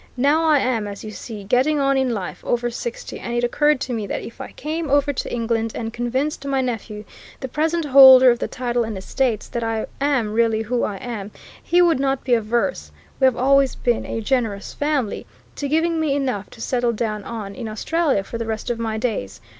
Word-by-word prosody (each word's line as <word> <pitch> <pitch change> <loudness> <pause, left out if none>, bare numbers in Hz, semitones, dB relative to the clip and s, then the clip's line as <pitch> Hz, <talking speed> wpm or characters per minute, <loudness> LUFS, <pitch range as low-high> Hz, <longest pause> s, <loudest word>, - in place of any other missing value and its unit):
Now, 290 +6 +3
I 310 -2 +5
am, 245 -6 0
as 200 0 -7
you 215 - -6
see, 215 -1 -8
getting 255 +8 +2
on 275 0 +2
in 265 -2 +1
life, 195 -6 -5
over 240 0 -1
sixty 235 0 -6
and 235 - -4
it 240 - 0
occurred 295 +4 +2
to 255 - -3
me 215 -3 -3
that - - -3
if 230 - -9
I - - -7
came 315 +1 -4
over 285 +1 +2
to - - -4
England 225 -1 -1
and 225 -1 -4
convinced 260 +6 -2
my 275 -1 0
nephew, 225 -4 -4 0.3
the 265 - -4
present 320 +5 0
holder 260 -2 +9
of 240 - -1
the - - -2
title 245 -1 -1
and 220 -3 -4
estates, 225 +3 -1
that 235 - -3
I 225 -1 -1 0.2
am 260 -7 +1
really 225 -1 +2
who 240 +2 -1
I 205 - -2
am, 210 -1 -6 0.3
he 355 +1 +3
would 330 -6 +3
not 270 -1 0
be 255 - +1
averse 235 +4 0 0.3
we 265 - +4
have 260 -2 +3
always 275 +1 +3
been 240 -2 -1
a 225 - -3
generous 225 -4 -1
family 290 -7 -1 0.3
to 285 - -3
giving 325 +3 +1
me 305 -3 +1
enough 255 -8 -2
to 225 - -13
settle 245 -1 0
down 215 -2 -3
on 210 -3 -6
in 240 -1 -6
Australia 275 +1 0
for 230 +4 -7
the 230 - -3
rest 220 +2 -3
of 235 - -3
my 220 -1 -2
days. 155 - -3
245 Hz, 215 wpm, -21 LUFS, 225-275 Hz, 0.3 s, holder